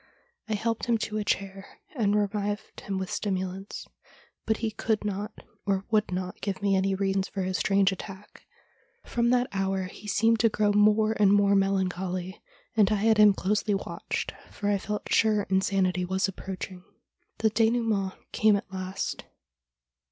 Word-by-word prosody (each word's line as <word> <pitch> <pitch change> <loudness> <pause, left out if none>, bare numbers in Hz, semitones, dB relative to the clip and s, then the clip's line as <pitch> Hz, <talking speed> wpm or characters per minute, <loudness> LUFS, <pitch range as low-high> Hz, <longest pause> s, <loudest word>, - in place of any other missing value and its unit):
I 215 - +1
helped 225 +3 -2
him 235 -1 +3
to 215 0 -3
a - - -1
chair, 195 - -3 0.2
and 210 -5 +2
revived 205 0 -2
him 195 -1 -3
with 190 -1 -4
stimulants, 190 -1 -3 0.6
but 220 0 +2
he 225 -1 -2
could 215 0 -1
not 205 +1 -4 0.2
or 195 -1 0
would 215 -3 +2
not 180 0 -4
give 195 -2 -2
me 200 -1 +2
any 190 0 +1
reason 195 0 +1
for 195 0 -4
his 185 0 -1
strange 195 -1 +3
attack. 195 +1 -9 0.3
' - - -39
From 235 0 +1
that 250 0 +3
hour 195 -1 -1
he 185 +3 -9
seemed 225 +2 +3
to 230 - +4
grow 210 -1 +1
more 210 +1 +4
and 200 -2 +5
more 200 0 +4
melancholy, 190 -1 0 0.3
and 215 -3 +5
I - - +4
had 215 +1 +3
him 210 -2 +7
closely 205 +2 0
watched, 195 - -4 0.2
for 205 - -3
I 200 - +1
felt 210 +2 -4
sure 215 -2 +3
insanity 190 -1 +2
was 190 +2 0
approaching. 190 -1 -7 0.5
The 220 -1 +2
cUnoument 220 -3 +1 0.2
came 215 -1 +4
at 195 -1 -5
last. 185 0 -4
200 Hz, 165 wpm, -27 LUFS, 190-215 Hz, 0.6 s, him